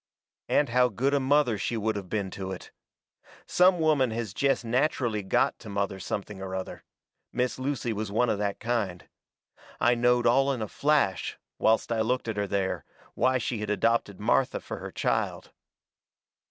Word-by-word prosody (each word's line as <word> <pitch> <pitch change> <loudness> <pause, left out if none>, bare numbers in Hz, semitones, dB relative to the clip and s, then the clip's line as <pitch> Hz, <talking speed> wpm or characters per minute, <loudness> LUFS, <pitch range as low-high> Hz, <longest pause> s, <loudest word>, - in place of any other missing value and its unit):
And 145 - +3
how 125 +1 +4
good 130 +6 0
a 140 - +3
mother 135 -5 +2
she 115 - -1
would 110 0 -1
of 95 -3 -6
been 100 -3 -2
to 95 0 -5
it. 95 - -8 0.7
Some 180 0 +4
women 150 -5 +3
has 110 -3 -4
jest 135 0 +1
natcherally 120 -3 +1
GOT 95 - +1
to - - -10
mother 100 -1 -2
something 100 +1 -5
or 95 -1 -4
other. 95 -1 -6 0.5
Miss 125 +1 -1
Lucy 130 -4 -2
was 105 -1 -4
one 120 +4 +2
of 105 - 0
that 100 -1 -2
kind. 110 -7 -2 0.7
I 120 - +4
knowed 120 0 +2
all 135 +4 +4
in 125 - -4
a - - -4
flash, 145 -7 +1 0.2
whilst 110 +1 +2
I 115 -1 +1
looked 125 +2 0
at 110 -2 -3
her 100 0 0
there, 100 -1 -1 0.3
why 130 0 +2
she 120 -2 -2
had 105 -1 -4
adopted 105 -2 +1
Martha 120 +4 +2
fur - - -7
her - - -7
child. - - -1
115 Hz, 180 wpm, -27 LUFS, 100-130 Hz, 0.7 s, how